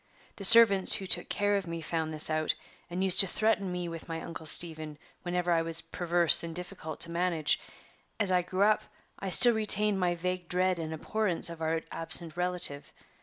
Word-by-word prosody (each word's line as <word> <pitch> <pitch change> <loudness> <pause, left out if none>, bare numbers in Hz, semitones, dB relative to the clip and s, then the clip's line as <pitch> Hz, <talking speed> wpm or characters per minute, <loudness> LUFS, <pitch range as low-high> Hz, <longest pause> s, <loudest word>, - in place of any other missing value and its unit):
The 195 - -5
servants 210 -3 +6
who 195 - -6
took - - -1
care 205 0 -1
of 195 -3 -6
me 165 0 -6
found 160 0 -4
this 155 -1 -2
out, 155 0 -2 0.3
and 180 +2 -4
used 190 -2 +3
to 195 - +6
threaten 205 -1 -2
me 180 -1 -5
with 165 0 -10
my 165 0 -5
Uncle 165 -1 -9
Stephen 155 -2 -1 0.2
whenever 175 0 -3
I 165 -1 +1
was 165 0 -3
perverse 170 0 +2
and 165 -1 -8
difficult 175 -3 -8
to 170 - -1
manage. 170 -3 -1 0.6
As 205 -3 +4
I 180 -1 +2
grew 185 +2 -2
up, 215 +1 +2 0.4
I 195 - -6
still 240 +6 +8
retained 210 -2 +2
my 175 -1 -1
vague 180 +1 -5
dread 185 0 -1
and 160 -1 -6
abhorrence 175 +1 -1
of 165 -1 -11
our 160 0 -2
absent 165 0 0
relative. 180 -5 0
175 Hz, 195 wpm, -28 LUFS, 165-190 Hz, 0.6 s, still